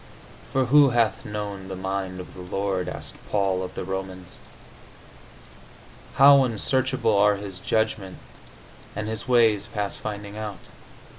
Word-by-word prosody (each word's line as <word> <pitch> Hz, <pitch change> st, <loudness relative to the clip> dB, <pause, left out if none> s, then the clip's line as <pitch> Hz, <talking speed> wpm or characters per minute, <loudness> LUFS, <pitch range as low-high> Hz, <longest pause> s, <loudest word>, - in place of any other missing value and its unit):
"For 130 Hz, -1 st, +2 dB
who 140 Hz, +2 st, +6 dB
hath 110 Hz, -4 st, +1 dB
known 105 Hz, -2 st, -5 dB
the 95 Hz, -, -5 dB
mind 95 Hz, 0 st, -3 dB
of 90 Hz, -, -9 dB
the 90 Hz, -, -10 dB
Lord?" 95 Hz, 0 st, -2 dB
asked -, -, -7 dB, 0.2 s
Paul 95 Hz, -2 st, +1 dB
of 90 Hz, -, -6 dB
the -, -, -4 dB
Romans. 95 Hz, -1 st, -6 dB, 1.8 s
"How 140 Hz, 0 st, +8 dB
unsearchable 125 Hz, -1 st, +1 dB
are 105 Hz, +1 st, +5 dB
his 100 Hz, -2 st, -7 dB
judgments, 110 Hz, -3 st, -1 dB, 0.8 s
and 105 Hz, +1 st, -3 dB
his 110 Hz, +2 st, -5 dB
ways 115 Hz, -4 st, +4 dB
past 105 Hz, -2 st, -4 dB
finding 105 Hz, -1 st, -6 dB
out!" 105 Hz, -3 st, -6 dB
105 Hz, 135 wpm, -25 LUFS, 95-115 Hz, 1.8 s, How